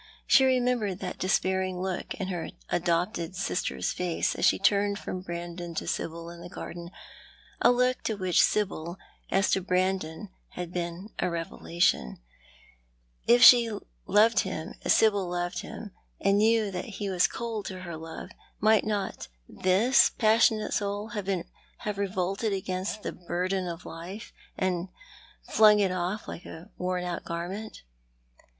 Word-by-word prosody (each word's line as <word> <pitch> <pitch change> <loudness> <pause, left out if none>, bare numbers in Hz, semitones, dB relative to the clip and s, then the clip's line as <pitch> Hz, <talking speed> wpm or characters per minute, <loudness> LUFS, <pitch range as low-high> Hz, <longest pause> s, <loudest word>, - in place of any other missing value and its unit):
She 265 - +6
remembered 245 -7 +1
that 185 - -5
despair 190 0 +1
ing 185 -1 -3
look 185 -1 -3
in 190 -2 -4
her 175 -3 -3 0.2
adopted 175 +1 0
sister's 185 -1 -1
face, 180 -2 -1
as - - 0
she - - +5
turned 200 +1 +2
from 185 -2 -5
Brandon 175 -1 -6
to - - -2
Sibyl 165 +1 -4
in 170 0 -11
the 175 - -9
garden; 170 -1 -7 0.7
a - - +6
look 250 +1 +2
which 185 -5 +1
to - - +8
Sibyl, 180 -4 -1 0.3
as 195 +1 +2
to 190 - +2
Brandon, 185 0 -1 0.2
had 180 -1 -6
been 175 +3 -4
a 180 - +1
revelation. 170 - 0
And - - -31 1.1
if 240 +1 +6
she 235 -1 +9 0.4
loved 220 +2 +5
him 180 -1 -3
as - - +2
Sibyl 205 -4 +4
loved 175 0 -2
him, 210 -3 -8 0.3
and 195 +1 +3
knew 220 -1 +3
that 180 -1 -4
he 200 -2 -3
was 180 -1 +4
cold 230 -3 -4
to 185 -1 -6
her 170 -2 -6
love, 160 +1 -8 0.3
might 215 0 +4
not 205 - -3 0.2
this 200 +8 +4
passionate 220 -1 +3
soul 205 +1 -2
have 205 -4 -4 0.7
revolted 195 +2 -1
against 190 +2 -3
the - - -3
burden 180 +1 -2
of 170 0 -6
life, 185 +7 -8 0.2
and 185 -1 -1 0.5
flung 215 -1 +6
it 195 -2 +2
off 185 +3 -3
like - - -7
a 165 +2 -10
worn 180 0 -1
out 175 -1 -4
garment 185 +6 -5
185 Hz, 150 wpm, -28 LUFS, 175-210 Hz, 1.1 s, she